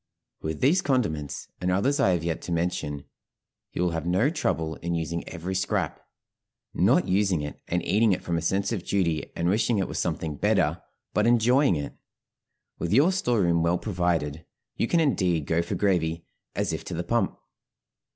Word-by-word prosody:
With 80 Hz, 0 st, -4 dB
these 160 Hz, +8 st, +4 dB
condiments 100 Hz, -, -1 dB
and 90 Hz, -, 0 dB
others 130 Hz, +11 st, +1 dB
I 95 Hz, -9 st, +4 dB
have 85 Hz, -2 st, -1 dB
yet 85 Hz, -1 st, -2 dB
to -, -, -6 dB
mention 80 Hz, -4 st, -2 dB, 0.7 s
you 90 Hz, -, -1 dB
will 90 Hz, -, +1 dB
have 80 Hz, 0 st, -3 dB
no 95 Hz, -, +2 dB
trouble 80 Hz, -, -1 dB
in 85 Hz, 0 st, -3 dB
using 85 Hz, +1 st, -3 dB
every 90 Hz, +2 st, -5 dB
scrap; 95 Hz, 0 st, -1 dB, 0.7 s
not -, -, +3 dB
using 95 Hz, -3 st, +2 dB
it 75 Hz, 0 st, -7 dB
and 90 Hz, 0 st, -1 dB
eating 105 Hz, +4 st, +3 dB
it 90 Hz, -, -1 dB
from 85 Hz, -, -1 dB
a 85 Hz, -, 0 dB
sense 95 Hz, +5 st, 0 dB
of 105 Hz, -6 st, -2 dB
duty, 85 Hz, -6 st, 0 dB
and 85 Hz, -, -1 dB
wishing 110 Hz, +4 st, +2 dB
it 95 Hz, -, 0 dB
was -, -, -4 dB
something 80 Hz, -3 st, -2 dB
better, -, -, +1 dB, 0.3 s
but 105 Hz, +2 st, +2 dB
enjoying 120 Hz, 0 st, +4 dB
it. 75 Hz, -2 st, -4 dB, 0.9 s
With 85 Hz, -, -2 dB
your 145 Hz, -, +5 dB
store 125 Hz, -, +1 dB
room 85 Hz, -2 st, +2 dB
well 85 Hz, +2 st, +2 dB
provided, 85 Hz, -6 st, -1 dB, 0.3 s
you -, -, 0 dB
can 170 Hz, -, +2 dB
indeed 90 Hz, -, +1 dB
go 80 Hz, +2 st, +1 dB
for -, -, -3 dB
gravy 85 Hz, -5 st, 0 dB, 0.3 s
"as -, -, -1 dB
if -, -, -4 dB
to -, -, -5 dB
the -, -, -2 dB
pump." -, -, 0 dB
90 Hz, 185 wpm, -26 LUFS, 80-105 Hz, 0.9 s, your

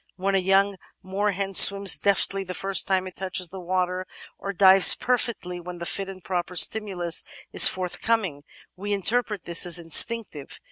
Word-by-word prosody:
When 195 Hz, +2 st, -4 dB
a 195 Hz, -, +1 dB
young 195 Hz, +1 st, 0 dB, 0.3 s
moorhen 195 Hz, 0 st, -4 dB
swims 200 Hz, +1 st, +6 dB
deftly 195 Hz, -1 st, -2 dB
the 185 Hz, -1 st, -9 dB
first 195 Hz, 0 st, +1 dB
time 190 Hz, -1 st, -2 dB
it 185 Hz, -, -11 dB
touches 185 Hz, -1 st, -6 dB
the 190 Hz, -, -11 dB
water, 185 Hz, +1 st, -4 dB, 0.3 s
or 200 Hz, -, -6 dB
dives 190 Hz, 0 st, +5 dB
perfectly 235 Hz, -8 st, -4 dB
when 175 Hz, 0 st, -11 dB
the 170 Hz, -, -8 dB
fit 195 Hz, +3 st, -5 dB
and 185 Hz, -2 st, -13 dB
proper 180 Hz, -1 st, -6 dB
stimulus 180 Hz, -3 st, +2 dB, 0.3 s
is -, -, +7 dB
forthcoming, 185 Hz, -3 st, -4 dB, 0.3 s
we 205 Hz, +3 st, -6 dB
interpret 210 Hz, 0 st, -3 dB
this 170 Hz, -1 st, -1 dB
as 175 Hz, -1 st, -4 dB
instinctive. 170 Hz, -1 st, +1 dB
190 Hz, 160 wpm, -22 LUFS, 180-200 Hz, 0.3 s, is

